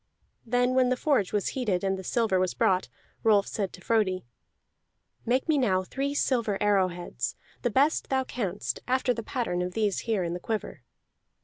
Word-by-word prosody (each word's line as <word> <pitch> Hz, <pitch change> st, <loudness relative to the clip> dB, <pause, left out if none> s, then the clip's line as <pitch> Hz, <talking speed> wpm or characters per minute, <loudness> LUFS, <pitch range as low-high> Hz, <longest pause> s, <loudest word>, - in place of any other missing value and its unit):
Then 245 Hz, +2 st, +2 dB
when 255 Hz, -1 st, +4 dB
the 255 Hz, -, +1 dB
forge 255 Hz, -10 st, +1 dB
was 205 Hz, -2 st, 0 dB
heated 210 Hz, -9 st, -1 dB
and 195 Hz, 0 st, +1 dB
the 190 Hz, -, -7 dB
silver 215 Hz, -2 st, +1 dB
was 185 Hz, -1 st, 0 dB
brought, 185 Hz, -1 st, +2 dB, 0.3 s
Rolf 210 Hz, -3 st, +4 dB
said 200 Hz, -3 st, -3 dB
to 180 Hz, -, -11 dB
Frodi: 190 Hz, -, +1 dB, 1.0 s
"Make 255 Hz, +5 st, +1 dB
me 310 Hz, -3 st, +3 dB
now 190 Hz, -7 st, +2 dB
three 275 Hz, +8 st, -3 dB
silver 235 Hz, -8 st, +1 dB
arrowheads, 185 Hz, -4 st, 0 dB, 0.3 s
the 240 Hz, -, +1 dB
best 280 Hz, +8 st, +2 dB
thou 265 Hz, -1 st, +2 dB
canst, 205 Hz, -7 st, -3 dB
after 255 Hz, 0 st, +2 dB
the 230 Hz, -, -4 dB
pattern 225 Hz, -7 st, -2 dB
of 180 Hz, 0 st, -3 dB
these 210 Hz, -3 st, +1 dB
here 210 Hz, -5 st, +2 dB
in 170 Hz, 0 st, -2 dB
the 175 Hz, -, -4 dB
quiver." 220 Hz, +3 st, -4 dB
215 Hz, 180 wpm, -28 LUFS, 185-250 Hz, 1.0 s, when